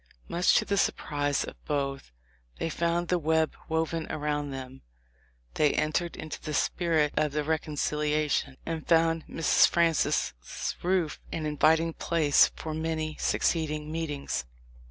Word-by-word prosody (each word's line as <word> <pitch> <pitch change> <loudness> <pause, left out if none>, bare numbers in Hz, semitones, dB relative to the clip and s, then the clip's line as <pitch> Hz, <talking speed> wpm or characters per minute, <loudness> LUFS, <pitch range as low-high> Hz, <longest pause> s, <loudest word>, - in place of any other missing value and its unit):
Much 175 +1 +3
to - - +3
the 200 - 0
surprise 145 -6 0
of - - -10
both 140 - -2 0.5
they 165 - -2
found 170 +2 0
the 180 0 +1
web 160 0 +1
woven 160 0 -1
around 145 -1 -2
them. 135 -1 -7 0.7
They 150 -2 +3
entered 155 +3 0
into 155 -1 -7
the 150 -1 -4
spirit 160 -3 +1
of 150 -2 +1
the 150 0 0
reconciliation, 150 -2 0
and 165 -1 -4
found 165 -1 +3
Mrs. 165 - +4
Francis' 165 -2 +2 0.5
roof 180 -3 0
an 160 -2 -3
inviting 160 +2 +3
place 155 -4 +3
for 155 - -5
many 160 -1 -2
succeeding 155 -2 0
meetings. 155 - -3
155 Hz, 135 wpm, -28 LUFS, 150-165 Hz, 0.7 s, Mrs